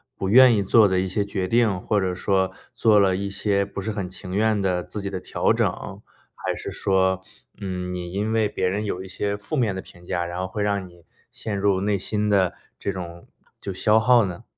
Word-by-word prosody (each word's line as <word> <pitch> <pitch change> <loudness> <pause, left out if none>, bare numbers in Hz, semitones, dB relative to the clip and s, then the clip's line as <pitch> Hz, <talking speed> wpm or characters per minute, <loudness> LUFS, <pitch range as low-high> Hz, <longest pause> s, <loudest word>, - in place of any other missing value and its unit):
不 95 - -3
愿 125 +1 +8
意 100 - +1
做 105 +2 +5
的 95 - +1
一 95 - -1
些 100 +2 -1
决 95 -2 -2
定， 110 -3 +2
或 105 - +1
者 95 -2 -1
说 95 0 +1 0.2
做 110 -2 +4
了 95 -2 +3
一 100 0 -3
些 100 0 0
不 100 0 -6
是 110 - -3
很 100 -4 -4
情 90 0 -8
愿 110 +1 +2
的 90 -2 0
自 105 +3 -7
己 100 - -3
的 95 - -4
调 - - 0
整， - - +2 0.7
还 - - -3
是 - - -6
说， 95 -1 +1 0.4
嗯， 90 -2 -4
你 90 -1 -5
因 105 +3 -1
为 110 -1 +2
别 95 - -2
人 105 +3 -2
有 95 -2 -3
一 - - -9
些 100 +2 -2
负 105 +9 -5
面 110 -7 +1
的 95 - -4
评 90 0 -16
价， 85 -1 -1
然 85 +1 -5
后 95 - -2
会 100 +2 -3
让 100 -2 -1
你 85 -1 -19 0.3
陷 105 -3 -4
入 100 -1 +2
内 105 0 +1
心 105 +2 -1
的 95 -3 +3 0.3
这 100 - -2
种 85 -2 -8 0.3
就 100 - -5
消 105 +4 +3
耗 120 +1 +5
呢？ 90 -2 -6
100 Hz, 245 characters per minute, -24 LUFS, 95-105 Hz, 0.7 s, 愿